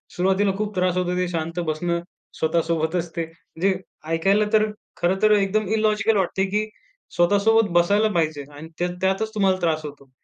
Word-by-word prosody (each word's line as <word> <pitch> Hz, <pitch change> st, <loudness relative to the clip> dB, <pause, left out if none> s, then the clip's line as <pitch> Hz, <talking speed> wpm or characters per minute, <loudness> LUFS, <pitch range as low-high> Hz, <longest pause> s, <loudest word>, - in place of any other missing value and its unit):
सुरुवातीला 190 Hz, +2 st, +2 dB
खूप 210 Hz, -1 st, -3 dB
त्रास 180 Hz, -1 st, +1 dB
होतो 180 Hz, 0 st, 0 dB
ते 180 Hz, 0 st, 0 dB
शांत 165 Hz, 0 st, -3 dB
बसणं 170 Hz, +2 st, -1 dB, 0.4 s
स्वतःसोबतच 165 Hz, +1 st, 0 dB
ते. 170 Hz, -, -1 dB
म्हणजे 165 Hz, +3 st, -3 dB, 0.4 s
ऐकायला 195 Hz, +6 st, +3 dB
तर 215 Hz, 0 st, +5 dB, 0.3 s
खरं 185 Hz, +2 st, 0 dB
तर 215 Hz, -, +5 dB
एकदम 205 Hz, 0 st, +2 dB
इलॉजिकल 215 Hz, 0 st, +2 dB
वाटते, 190 Hz, 0 st, 0 dB
की 210 Hz, +2 st, -1 dB, 0.5 s
स्वतःसोबत 205 Hz, +5 st, +3 dB
बसायला 200 Hz, +5 st, +3 dB
पाहिजे 155 Hz, -4 st, 0 dB
आणि 155 Hz, +3 st, -9 dB
त्या 175 Hz, -, +1 dB
त्यातच 195 Hz, +4 st, 0 dB
तुम्हाला 195 Hz, -3 st, +2 dB
त्रास 160 Hz, -2 st, +1 dB
होतो. 140 Hz, -2 st, -10 dB
185 Hz, 160 wpm, -23 LUFS, 165-205 Hz, 0.5 s, तर